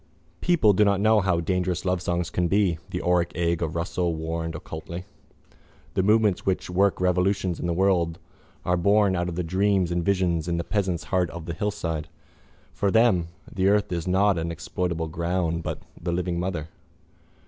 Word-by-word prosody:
—People 155 -13 +4
do 105 - +4
not 100 -1 +3
know 110 +1 +4
how 90 -3 +1
dangerous 90 +1 -1
lovesongs 90 -1 -1
can 90 -1 +1
be, 95 -4 +2
the - - -4
auric 90 -1 +2
egg 85 -1 0
of 80 -1 -2
Russell 85 0 -1
warned 80 +1 -3
occultly. 85 +2 -7 0.9
The 95 - +2
movements 105 -1 +3
which 95 -1 -1
work 95 +2 +2
revolutions 90 0 +1
in - - -2
the - - 0
world 85 -2 +2 0.5
are 90 0 +2
born 100 +2 +3
out 90 0 -1
of 85 - -5
the 90 - -1
dreams 95 +1 +1
and 85 0 0
visions 90 -4 +1
in 85 -1 0
a - - -1
peasant's 95 -4 -1
heart 90 -1 +2
on 85 -2 -8
the 85 - -4
hillside. 85 -6 -3 0.7
For 100 - 0
them 100 -6 +3 0.3
the 95 0 +1
earth 105 0 +2
is 85 0 -2
not 95 0 +3
an 85 +1 -2
exploitable 85 0 -3
ground 85 +1 -1
but - - -5 0.2
the 85 0 -2
living 85 0 -1
mother. 85 -4 -3
90 Hz, 180 wpm, -25 LUFS, 85-95 Hz, 0.9 s, People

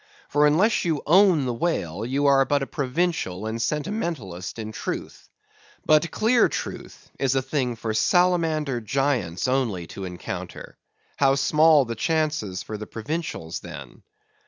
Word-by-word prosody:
For 150 +1 +4
unless 185 +10 +3
you 160 -4 -1
own 175 -3 +5
the 125 - -1
whale, 110 - -2
you 135 +4 -1
are 135 -1 +5
but 140 0 0
a - - -2
provincial 140 - -2
and 110 +1 -3
sentimentalist 150 - -3
in 110 -1 -5
Truth. - - -6 0.6
But 155 +2 +4
clear 230 +2 +3
Truth - - -7
is 135 -1 +1
a 135 - +2
thing 130 -3 -1
for 110 -1 -3
salamander 160 - +2
giants 125 -7 -1
only 120 -9 0
to 95 - -6
encounter; 90 -1 -7 0.4
how 135 -1 +4
small 150 +1 +4
the 115 - -4
chances 150 - -1
for 105 -1 -6
the 105 - -7
provincials 115 - -4
then? - - -10
135 Hz, 145 wpm, -24 LUFS, 110-160 Hz, 0.6 s, own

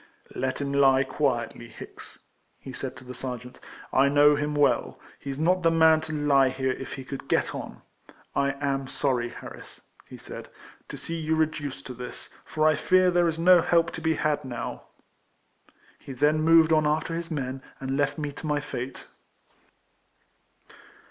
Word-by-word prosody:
"Let 130 0 -2
him 140 -1 -2
die 135 -1 +4
quietly, 130 -4 -2
Hicks," 115 - -12 0.4
he 130 - -10
said 130 0 -5
to 130 - -12
the 125 0 -9
sergeant. 125 -1 -7 0.2
" - - -18
I 135 +1 +5
know 145 +1 +6
him 150 0 -2
well; 145 -1 +1 0.2
he 140 - -5
's 135 - -6
not 180 +4 +2
the 165 - +4
man 160 -1 +5
to 160 - -7
lie 145 -3 +3
here 130 0 -1
if 135 - -6
he 135 - -7
could 135 0 -7
get - - +1
on. - - -8 0.2
— - - -24
I 140 0 +1
am 135 -1 -2
sorry, 125 -4 -1
Harris," - - -11 0.3
he - - -10
said, - - -10 0.2
" - - -23
to - - -6
see 165 0 -5
you 160 0 0
reduced 155 -3 -2
to 130 - -6
this, 125 0 -9
for 155 0 +1
I 155 - +5
fear 185 +4 +3
there 175 -1 +3
is 160 - -3
no 175 +1 +6
help 170 0 +2
to 165 - -7
be 160 0 +1
had 150 0 0
now." 125 -3 -6 1.1
He 135 - -9
then 150 +4 +2
moved 165 0 +5
on 155 -1 +3
after 155 +2 0
his 165 0 -4
men, 135 -4 -4 0.2
and 135 0 -3
left 145 +2 0
me 150 -2 -3
to 150 - -8
my 150 -1 +1
fate. 135 -3 -6
145 Hz, 190 wpm, -26 LUFS, 135-160 Hz, 1.1 s, know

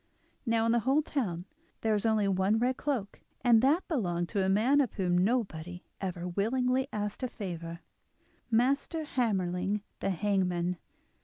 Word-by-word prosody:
Now 225 0 +2
in 230 - +3
the 235 - +3
whole 270 +6 +2
town 185 - -2 0.4
there 220 -1 +2
was 210 +2 +1
only 215 -2 +2
one 195 +2 +2
red 250 +3 +1
cloak, 245 -10 -3 0.2
and 235 -3 +5
that 300 +8 +2
belonged 175 - -1
to 200 - 0
a 190 - +1
man 240 +9 +4
of 255 - -1
whom 180 -3 0
nobody 180 -4 0 0.2
ever 180 -2 -3
willingly 250 +8 +1
asked 210 -1 -3
a 255 - 0
favour—Master 225 - -3
Hammerling 200 -7 0 0.2
the - - -1
hangman. 180 -2 0
210 Hz, 150 wpm, -30 LUFS, 180-250 Hz, 0.4 s, and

